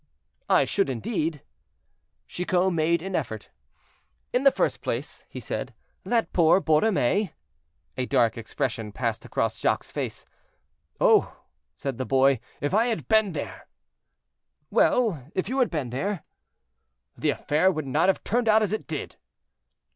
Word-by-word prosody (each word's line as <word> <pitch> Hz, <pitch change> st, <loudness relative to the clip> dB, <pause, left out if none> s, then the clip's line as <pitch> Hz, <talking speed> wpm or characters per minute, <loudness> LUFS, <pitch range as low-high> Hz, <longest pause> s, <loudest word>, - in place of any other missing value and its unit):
"I -, -, +5 dB
should 195 Hz, -7 st, 0 dB
indeed." 150 Hz, -, -2 dB, 0.8 s
Chicot 180 Hz, +1 st, 0 dB
made 165 Hz, +1 st, +1 dB
an 190 Hz, -1 st, -3 dB
effort. 110 Hz, -9 st, -4 dB, 0.8 s
"In 250 Hz, -, +2 dB
the 275 Hz, -, +7 dB
first -, -, 0 dB
place," -, -, -4 dB
he -, -, -7 dB
said, -, -, -5 dB, 0.3 s
"that 235 Hz, -2 st, 0 dB
poor 170 Hz, +1 st, +5 dB
Borromée—" 185 Hz, -, +2 dB, 0.6 s
A 130 Hz, -1 st, -1 dB
dark 115 Hz, -2 st, +3 dB
expression 115 Hz, -1 st, -3 dB
passed 115 Hz, 0 st, -3 dB
across -, -, -1 dB
Jacques' -, -, +1 dB
face. -, -, -4 dB, 0.7 s
"Oh!" -, -, +3 dB, 0.3 s
said 135 Hz, -3 st, -4 dB
the 130 Hz, -, -1 dB
boy, 135 Hz, -1 st, +4 dB, 0.2 s
"if 145 Hz, +4 st, -1 dB
I 225 Hz, +4 st, +4 dB
had 230 Hz, -3 st, -2 dB
been 220 Hz, -4 st, +3 dB
there—" 145 Hz, -, -6 dB, 1.0 s
"Well! 175 Hz, -, +2 dB
if 185 Hz, -, -1 dB
you 260 Hz, +4 st, -1 dB
had 250 Hz, -, +3 dB
been 145 Hz, -8 st, -3 dB
there?" 190 Hz, +7 st, -2 dB, 0.9 s
"The -, -, 0 dB
affair 160 Hz, +6 st, +2 dB
would 155 Hz, -5 st, -4 dB
not 155 Hz, +7 st, +2 dB
have 190 Hz, -, +1 dB
turned 235 Hz, +1 st, +1 dB
out 220 Hz, 0 st, +5 dB
as 210 Hz, -, -1 dB
it 215 Hz, -, -3 dB
did." 155 Hz, -3 st, -5 dB
165 Hz, 145 wpm, -26 LUFS, 135-205 Hz, 1.0 s, the